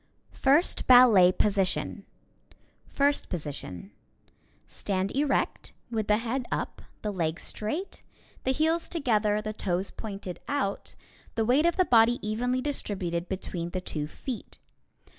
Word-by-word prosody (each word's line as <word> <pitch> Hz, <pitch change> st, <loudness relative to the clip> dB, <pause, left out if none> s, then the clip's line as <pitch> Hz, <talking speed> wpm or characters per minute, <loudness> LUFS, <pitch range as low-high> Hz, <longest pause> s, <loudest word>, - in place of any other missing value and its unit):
First 285 Hz, +6 st, +2 dB
Position: 205 Hz, -5 st, +5 dB, 2.7 s
Stand 195 Hz, -1 st, -2 dB
erect, 285 Hz, 0 st, 0 dB, 0.2 s
with 220 Hz, -2 st, -1 dB
the 210 Hz, -, +4 dB
head 240 Hz, +3 st, -2 dB
up, -, -, -3 dB, 0.2 s
the 210 Hz, -1 st, -2 dB
legs 165 Hz, -2 st, -2 dB
straight, 300 Hz, -, -4 dB, 0.4 s
the -, -, -1 dB
heels 320 Hz, +4 st, +1 dB
together, 215 Hz, -9 st, +1 dB
the 215 Hz, 0 st, -3 dB
toes 190 Hz, -2 st, -2 dB
pointed 195 Hz, -4 st, -7 dB
out, 270 Hz, -9 st, -2 dB, 0.4 s
the 225 Hz, -, +1 dB
weight 275 Hz, +8 st, +4 dB
of 340 Hz, -, 0 dB
the 370 Hz, -, +4 dB
body 235 Hz, -2 st, +5 dB
evenly 245 Hz, +4 st, 0 dB
distributed 185 Hz, -11 st, -3 dB
between 175 Hz, -3 st, -4 dB
the 185 Hz, +1 st, -4 dB
two 150 Hz, -4 st, -3 dB
feet. 240 Hz, -, -7 dB
215 Hz, 115 wpm, -28 LUFS, 190-260 Hz, 2.7 s, Position